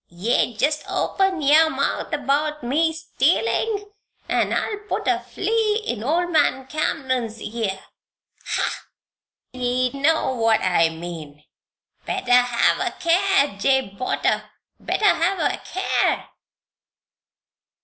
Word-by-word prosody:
Yeou 235 0 +1
jest 295 +4 +1
open 385 -4 0
yer 310 +3 +5
mouth 275 +2 -2
about 295 0 -1
me 310 +7 +1
stealin' 320 - 0 0.4
an' - - +1
I'll 420 -2 -1
put - - -2
a - - +2
flea 435 +1 -1
in 240 -3 -3
old 345 +6 0
man 290 -4 +2
Cameron's 260 -5 -2
ear. 215 -4 -3 0.6
Ha! - - -3 0.7
Ye 250 0 0
know 280 0 +1
what 225 -2 +2
I 170 -3 +2
mean. 160 -3 -9 0.6
Better 250 - -2
hev 245 -1 +4
a - - -3
care, 345 - +2
Jabe 265 -3 +1
Potter 255 - -1 0.3
better 430 - -1
hev 380 0 +3
a - - 0
care!" 375 - -1
275 Hz, 115 wpm, -22 LUFS, 235-330 Hz, 0.7 s, yer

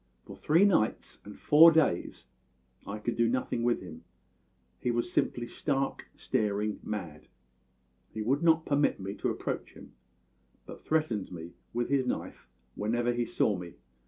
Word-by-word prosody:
For 100 - -10
three 155 - +3
nights 165 - +1
and 105 - -11
four 160 +3 +8
days 155 - 0 0.6
I 100 - -4
could 115 +2 -3
do 115 0 +2
nothing 125 -1 -1
with 120 0 +1
him; 85 -4 -10 0.8
he 125 - -2
was 120 +9 -1
simply 120 -8 0
stark, 135 +2 -2
staring 105 0 -1
mad; 85 -8 -6 0.8
he 110 - -4
would 135 +6 +1
not 160 -1 +3
permit 145 -5 +1
me 95 +1 -5
to - - -1
approach - - -4
him, - - -14 0.7
but - - -11
threatened 135 -13 -1
me 85 -1 -8 0.2
with 120 0 -2
his 135 -2 +1
knife 125 - -4 0.3
whenever 120 - 0
he 120 0 -1
saw 105 -3 +1
me. 90 -2 -8
120 Hz, 155 wpm, -30 LUFS, 105-140 Hz, 0.8 s, four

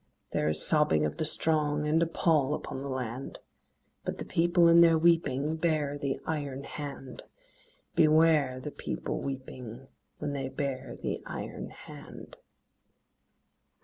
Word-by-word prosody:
There 75 - 0
is 75 0 +3
sobbing 150 - +3
of 75 - -3
the 155 - -1
strong, 150 -1 +1
And 160 +2 +3
a 170 - +3
pall 155 -4 +2
upon 130 - -6
the 140 - -5
land; 130 0 -4 0.7
But - - -4
the - - -5
People 170 +1 +3
in 170 0 +7
their 165 -1 +6
weeping 160 -3 +2
Bare 155 -3 0
the 140 -2 -2
iron 145 -4 -3
hand: 140 -4 -7 0.7
Beware 155 -4 +4
the 145 +3 -6
People - - -4
weeping 130 -2 -7 0.3
When 145 -1 -3
they 135 -2 -3
bare 135 -2 -4
the - - -3
iron - - -6
hand. - - -12
145 Hz, 140 wpm, -29 LUFS, 130-160 Hz, 0.7 s, in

